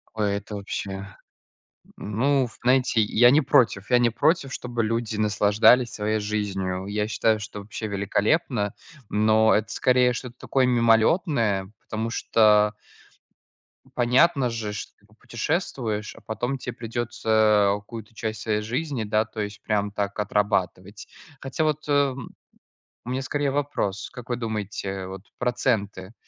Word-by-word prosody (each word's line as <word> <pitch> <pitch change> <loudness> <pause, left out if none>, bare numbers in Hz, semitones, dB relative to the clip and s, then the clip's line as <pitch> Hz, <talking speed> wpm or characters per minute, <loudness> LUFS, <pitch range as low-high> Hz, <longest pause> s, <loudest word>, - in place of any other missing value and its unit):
Ой, 105 -2 0
это 100 +1 -6
вообще. 100 0 -5 1.1
Н 105 0 -6
ну, 135 -1 +2
знаете, 125 -2 +3
я 120 +4 +5
не 150 +3 +4
против. 120 -7 +2
Я 125 - +6
не 120 -1 +3
против, 140 +4 +1
чтобы 120 -1 -3
люди 115 0 -2
наслаждались 105 +3 +4
своей 110 +1 -1
жизнью. 95 -3 -2
Я 105 +1 -1
считаю, 110 0 +1
что 105 0 -7
вообще 110 +2 -6
великолепно, 105 - 0 0.4
но 110 +1 +4
это, 110 +1 0
скорее, 125 -1 +3
что-то 120 0 -7
такое, 135 -1 +1
мимолетное, 115 - +2
потому 110 +1 -4
что 105 -2 +3 1.2
понятно 125 +2 +3
же, 110 -3 -4
что 105 - -6
ты 100 - -27
попутешествуешь, 110 - -3
а - - -15
потом 120 +4 -3
те 125 -1 -6
придется 110 -3 +1
у - - -9
какую-то 110 +1 -10
часть 110 -1 -4
своей 105 -2 0
жизни, 125 +1 -3
да, 105 +1 +2
то 110 0 -10
есть 105 0 -5
прям 105 -1 0
так 100 0 -3
отрабатывать. 100 -1 -1 0.3
Хотя 135 +4 -2
вот, 155 -1 -1
э, - - -1 0.2
м, 130 -2 -9 0.7
у 125 - -8
меня 130 +1 -1
скорее 145 +1 -1
вопрос. 135 -9 -2
Как 125 0 -11
вы 120 - -1
думаете, 100 -4 -4
вот 95 0 -8
проценты, 110 -5 -1
110 Hz, 145 wpm, -24 LUFS, 105-125 Hz, 1.2 s, Я